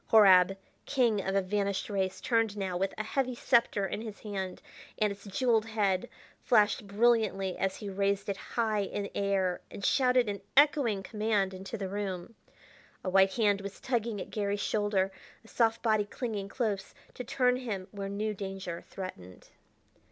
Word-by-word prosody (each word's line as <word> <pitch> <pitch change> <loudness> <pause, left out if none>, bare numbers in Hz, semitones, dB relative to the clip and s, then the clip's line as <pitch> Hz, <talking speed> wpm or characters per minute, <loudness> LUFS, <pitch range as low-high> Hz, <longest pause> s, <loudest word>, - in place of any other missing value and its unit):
Horab, 195 -3 +7 0.3
king 235 -7 +2
of 195 - -1
a 195 - +3
vanished 200 0 -1
race, 190 -2 -1
turned 225 -3 +1
now 190 -3 -2
with 190 +2 0
a 215 - -2
heavy 255 +3 -1
scepter 235 -5 +2
in 205 - -4
his 220 -3 -8
hand; 190 -3 -4 0.4
and 210 -2 +2
its 200 +1 -16
jeweled 225 +2 +1
head 200 -4 0 0.3
flashed 210 -2 +3
brilliantly 205 -3 +2
as 190 0 -1
he 210 - -7
raised 200 0 0
it 200 - -1 0.2
high 220 -3 +2
in 200 0 -4
air 195 -2 0
and 200 - -6
shouted 250 -3 +3
an 200 -1 -3 0.2
echoing 280 -9 +4
command 210 -2 0
into 190 +4 -6
the 195 -2 -3
room. 195 +1 -4 0.7
A 185 - -2
white 190 0 +4
hand 205 -4 +2
was 200 0 -7
tugging 235 -4 -1
at - - -7
Garry's 205 -1 -1
shoulder, 205 -2 +1 0.3
a - - -15
soft 225 0 +1
body 215 -3 +2
clinging 205 -3 -4
close, 205 -5 -2 0.2
to 250 - -6
turn 250 +1 +2
him 205 -7 -4
where 200 -1 -5
new 210 +2 -2
danger 190 -3 -5
threatened. 95 - -8
205 Hz, 165 wpm, -30 LUFS, 195-225 Hz, 0.7 s, Horab